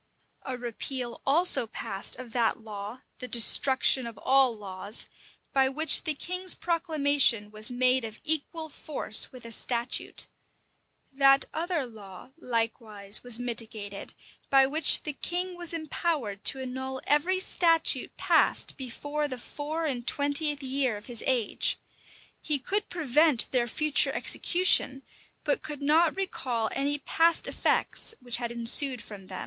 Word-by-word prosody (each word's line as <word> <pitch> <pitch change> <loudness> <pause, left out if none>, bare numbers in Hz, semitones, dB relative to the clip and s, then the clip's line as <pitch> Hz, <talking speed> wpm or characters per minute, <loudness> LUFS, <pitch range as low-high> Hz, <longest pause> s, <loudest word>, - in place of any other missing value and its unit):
A 255 -1 -4
repeal 245 +1 -5
also 305 -4 +3
passed 200 -3 -3
of 240 -2 -11
that 235 -3 0
law, 210 +3 -8 0.2
the 250 - -6
destruction 260 +1 +4
of 230 -3 -10
all 265 +3 +3
laws, 200 -1 -4 0.5
by 265 -1 +2
which 315 +6 +3
the 310 -2 0
king's 365 +4 -1
proclamation 290 - +1
was 215 0 -1
made 255 +1 +2
of 220 -1 -8
equal 315 +1 -1
force 290 -7 0
with 250 -2 -13
a 230 - -8
statute.[] 240 +2 +1 0.9
That 275 0 +5
other 330 -3 -2
law, 210 -2 -13
likewise, 225 -7 -3
was 245 -2 0
mitigated, 220 -4 -6 0.3
by 270 -1 +5
which 305 +4 +4
the 300 - -4
king 360 +5 -4
was 350 -1 +2
empowered 310 - -3
to 270 - +5
annul 260 +1 -6
every 335 +6 +1
statute 330 -7 +1
passed - - +2
before 290 +3 -4
the 255 -3 -6
four 300 +6 -5
and 255 -5 -4
twentieth 290 0 +2
year 260 -4 -1
of 205 - -13
his 240 -3 -4
age: 245 -5 +1 0.6
he 300 -2 0
could 405 +10 -3
prevent 305 -4 +3
their 245 -2 0
future 305 +4 +2
execution; 310 -7 +3 0.4
but 290 - 0
could 295 -2 -7
not 315 +3 +2
recall 255 - -3
any 285 +1 -2
past 330 +3 +1
effects 450 - -1
which 245 -2 0
had 240 -1 -5
ensued 240 +2 +2
from 200 -3 -12
them. - - -7
265 Hz, 140 wpm, -27 LUFS, 235-305 Hz, 0.9 s, That